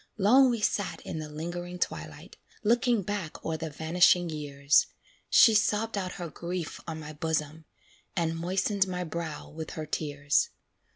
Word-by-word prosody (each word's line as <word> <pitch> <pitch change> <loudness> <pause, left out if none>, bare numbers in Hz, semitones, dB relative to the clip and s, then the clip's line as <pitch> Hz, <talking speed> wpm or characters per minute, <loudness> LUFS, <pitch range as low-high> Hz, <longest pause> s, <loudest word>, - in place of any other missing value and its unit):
Long 250 +6 +6
we 235 -3 -1
sat 205 -1 0
in 160 - -5
the 155 -1 -6
lingering 175 +3 -5
twilight, - - -4 0.3
Looking 235 0 +3
back 195 -4 -5
o'er 160 - -1
the 160 0 -4
vanishing 170 +3 +3
years; 145 -1 +2 0.4
She 225 - +7
sobbed 215 +1 +2
out 185 -2 -3
her 175 -4 -6
grief 175 -1 -5
on 160 -1 -4
my 155 0 -8
bosom, 155 0 -2 0.5
And 165 -1 0
moistened 190 +3 0
my 180 -1 -3
brow 165 -1 -5
with 160 0 -7
her 155 - -3
tears. 145 -2 0
170 Hz, 155 wpm, -29 LUFS, 155-195 Hz, 0.5 s, She